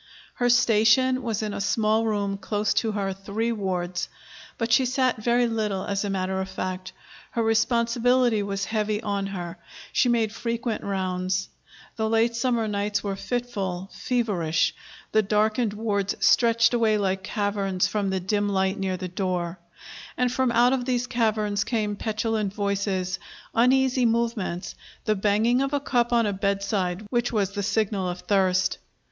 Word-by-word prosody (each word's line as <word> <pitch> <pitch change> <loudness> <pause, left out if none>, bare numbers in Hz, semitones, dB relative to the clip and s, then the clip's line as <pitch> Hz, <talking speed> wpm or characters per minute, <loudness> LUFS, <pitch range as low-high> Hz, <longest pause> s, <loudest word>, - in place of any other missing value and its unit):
Her 245 0 +1
station 245 +2 +4
was 225 -3 -2
in 210 -1 -3
a - - -3
small 220 +2 +2
room 200 -2 -1
close 210 +1 0
to 220 -2 0
her 195 -2 -1
three 200 +4 -2
wards. 180 -4 -2 0.5
But 230 0 -2
she 250 +3 +5
sat 255 0 +1
very 240 +2 +3
little, 215 -4 -1
as 200 0 -1
a 205 - -2
matter 190 0 -1
of 190 - -5
fact. 185 0 -4 0.4
Her 230 - +1
responsibility 235 +1 +2
was 200 -1 -2
heavy 215 -1 -1
on 200 -1 -1
her; 175 -3 -6 0.3
she 250 - +3
made 225 -3 +1
frequent 230 -1 -3
rounds. 185 -1 -1 0.5
The 220 -1 0
late 225 +1 +2
summer 235 -2 +1
nights 205 -1 -1
were 200 -1 -2
fitful, 195 -5 -3
feverish; 190 -10 0 0.4
the 215 - +4
darkened 215 +2 +1
wards 205 -2 -1
stretched 230 0 +4
away 225 -3 +3
like 190 -2 0
caverns 195 -2 -1
from 200 +1 -1
the 190 0 0
dim 205 +3 0
light 190 -1 0
near 190 -1 -1
the 185 0 -4
door. 180 -1 -2 0.6
And 250 -1 +1
from 260 -1 +1
out 240 +2 +4
of 255 -2 -1
these 250 -1 0
caverns 215 -4 0
came 215 -3 -1
petulant 215 -1 -2
voices, 200 -2 -1 0.3
uneasy 255 +1 +3
movements, 225 -6 -1 0.3
the 215 - +3
banging 215 +5 +2
of 275 +1 -1
a 285 - +2
cup 245 -3 0
on 235 -1 +3
a 205 - 0
bedside, 200 -1 -1
which 240 -1 +1
was 200 -4 0
the 200 0 -3
signal 200 -2 0
of 180 0 -5
thirst. 190 -2 +1
210 Hz, 160 wpm, -25 LUFS, 195-235 Hz, 0.6 s, she